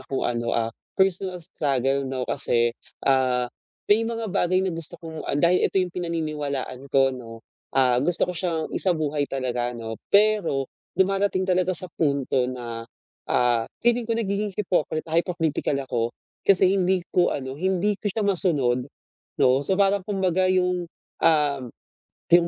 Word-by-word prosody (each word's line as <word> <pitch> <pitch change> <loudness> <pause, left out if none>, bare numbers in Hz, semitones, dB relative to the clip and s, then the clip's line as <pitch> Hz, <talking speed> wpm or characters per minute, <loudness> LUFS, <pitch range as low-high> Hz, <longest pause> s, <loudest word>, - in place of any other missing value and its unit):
akong, 130 0 -3
ano, 120 -1 -1
ah, 115 -1 0 0.2
personal 190 -1 +1
struggle, 140 -6 -1
'no. 130 -1 -2
Kasi, 120 -1 +1 0.3
ah, 130 -2 +3 0.4
may 215 +2 +3
mga 230 -4 -4
bagay 185 -1 +2
na 185 - -1
gusto 165 -2 -5
kong 160 -2 -8
ah, - - 0
dahil 170 +4 +3
ito - - -6
'yong 185 -2 +1
pinaniniwalaan 150 -6 -3
ko, 135 0 +3
'no, 115 -3 -10 0.3
ah, 125 -2 +4
gusto 170 +6 +3
ko 180 - -4
siyang 170 -2 -2
isabuhay 155 -5 0
talaga, 125 -2 -2
'no. 115 -1 -6
Pero 200 -9 +3 0.3
dumadating 195 0 +2
talaga 185 -1 +1
sa 185 0 -4
punto 140 -4 +1
na, 115 -2 -6 0.4
ah, 120 -2 +2 0.2
feeling 240 -1 +2
ko 230 - +1
nagiging 210 -1 -1
hipokrita 165 -5 -1
hypocritical 165 -4 0
ako 125 -3 -2 0.5
kasi 190 -1 +5
hindi 185 -2 +1
ko, 175 -1 +4
ano, 130 -2 -5
hindi 190 +6 0
ko 210 - -1
siya 210 +2 -2
masunod, 145 -11 +2 0.5
'no. 130 +1 +4
So, 190 +7 0
parang 200 0 +3
kumbaga 185 -2 +1
'yong, 180 -1 +1 0.3
um, 150 -4 +3 0.7
'yong 170 0 +6
165 Hz, 150 wpm, -24 LUFS, 130-185 Hz, 0.7 s, yong